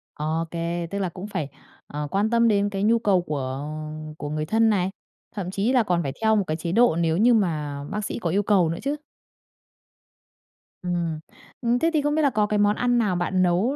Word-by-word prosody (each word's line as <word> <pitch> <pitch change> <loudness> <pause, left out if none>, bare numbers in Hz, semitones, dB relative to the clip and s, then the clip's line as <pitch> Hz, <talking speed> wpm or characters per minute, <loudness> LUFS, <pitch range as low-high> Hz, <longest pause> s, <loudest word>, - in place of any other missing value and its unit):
Ô 155 +2 -1
kê, 170 0 -2
tức 200 - -2
là 190 -2 -1
cũng 185 +4 -8
phải, 155 -8 -3 0.4
ờ, 150 0 -4
quan 205 +3 +1
tâm 235 0 +3
đến 205 -2 +2
cái 195 -1 -3
nhu 230 +2 +4
cầu 195 -5 +3
của 140 -3 -4 0.5
của 145 - -5
người 155 +1 -2
thân 225 +6 +3
này, 190 -3 +1 0.5
thậm 185 -3 -4
chí 205 +6 0
là 250 -3 +4
còn 175 -4 0
phải 135 -2 -3
theo 220 0 +4
một 205 - +2
cái 155 - -1
chế 170 +1 -3
độ 235 -4 +4
nếu 165 -1 +1
như 235 +5 +5
mà 150 -9 0
bác 210 0 -3
sĩ - - -4
có 175 - -2
yêu 200 +5 +1
cầu 190 -5 +3
nữa 165 - -3
chứ. 280 +2 -1 1.9
Ừm. 170 -3 -2 0.4
Ừm, 240 0 +2
thế 330 - +3
thì 305 - +3
không 295 +1 0
biết 315 - +2
là 285 - +4
có 215 -3 +1
cái 210 0 0
món 205 0 +3
ăn 245 +1 +1
nào 205 -6 +1
bạn 185 +1 +1
nấu 185 +10 +2
195 Hz, 225 wpm, -24 LUFS, 165-220 Hz, 1.9 s, như